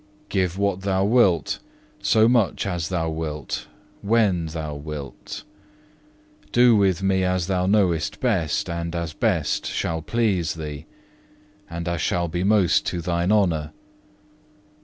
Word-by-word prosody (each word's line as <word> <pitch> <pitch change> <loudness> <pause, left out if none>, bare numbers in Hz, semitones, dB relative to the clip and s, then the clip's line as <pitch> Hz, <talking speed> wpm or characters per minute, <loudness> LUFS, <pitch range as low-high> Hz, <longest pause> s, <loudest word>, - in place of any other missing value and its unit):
Give 95 -2 0
what 100 -2 0
Thou 95 0 +1
wilt, 100 - +3 0.4
so 110 0 +4
much 120 -6 +2
as 85 -4 -2
Thou 80 -3 -1
wilt, 75 -3 -4 0.3
when 100 -6 +2
Thou 80 -2 -5
wilt. 75 -2 -7 1.1
Do 120 -1 +6
with 95 -3 +2
me 95 -1 +2
as 90 -1 0
Thou 90 -1 0
knowest 90 -6 +1
best, 95 - 0
and 85 0 -4
as 85 -2 -3
best - - 0
shall 80 0 -2
please 95 -5 0
Thee, 75 -2 -7 0.8
and 85 0 -5
as 85 -1 -1
shall 85 0 0
be 85 +2 -2
most 100 -3 +3
to 90 - -2
Thine 85 +2 0
honour. 85 -8 +1
90 Hz, 135 wpm, -23 LUFS, 80-100 Hz, 1.1 s, Do